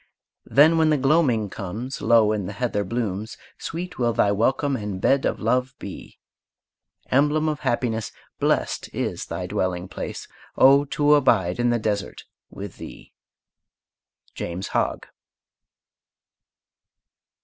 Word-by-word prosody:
Then, 160 +4 +5
when 160 -1 +4
the 155 - +3
gloaming 135 -6 +2
comes, 105 +7 -6
Low 115 -3 +4
in 105 -4 -2
the 100 - -6
heather 105 -1 -1
blooms, 110 -1 -3 0.2
Sweet 175 -1 -6
will 120 -1 +2
thy 105 -3 +3
welcome 135 +7 +1
and 105 -5 -4
bed 135 +7 +2
of - - -1
love 125 0 0
be! - - -9 0.9
Emblem 150 +4 +3
of 150 -1 -1
happiness, 115 -5 -1 0.3
Blest - - 0
is - - -3
thy - - -4
dwelling 90 0 -2
place. - - -6 0.3
Oh, 140 +2 +6
to 145 +1 +2
abide 115 -10 +3
in 120 0 +2
the 120 - +2
desert 105 -3 -3 0.3
with 100 -2 -9
thee! - - -11 1.2
JAMES 90 +3 -5
HOGG. - - -1
120 Hz, 125 wpm, -23 LUFS, 100-140 Hz, 1.2 s, Oh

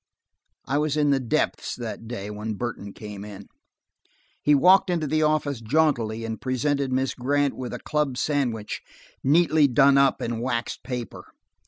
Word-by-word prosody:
I 140 +2 0
was 150 0 0
in 145 -1 +3
the 135 - +3
depths 120 -4 -1
that 115 -1 -6
day 105 -3 -5
when 105 +1 -4
Burton 110 -3 -5
came 105 -1 -9
in. 100 -1 -9 1.0
He 150 - +4
walked 185 +6 +5
into 170 -3 0
the 155 +2 +1
office 150 -4 +1
jauntily 115 -4 +1
and 110 0 -5
presented 135 +1 0
Miss 130 +1 0
Grant 140 +2 0
with 125 -1 -5
a - - -4
club 150 -4 -1
sandwich 125 -8 -1 0.4
neatly 155 0 +4
done 135 +2 +5
up 140 -1 +3
in 115 -1 -3
waxed 120 -1 -2
paper. 125 -2 -6
130 Hz, 160 wpm, -25 LUFS, 115-145 Hz, 1.0 s, walked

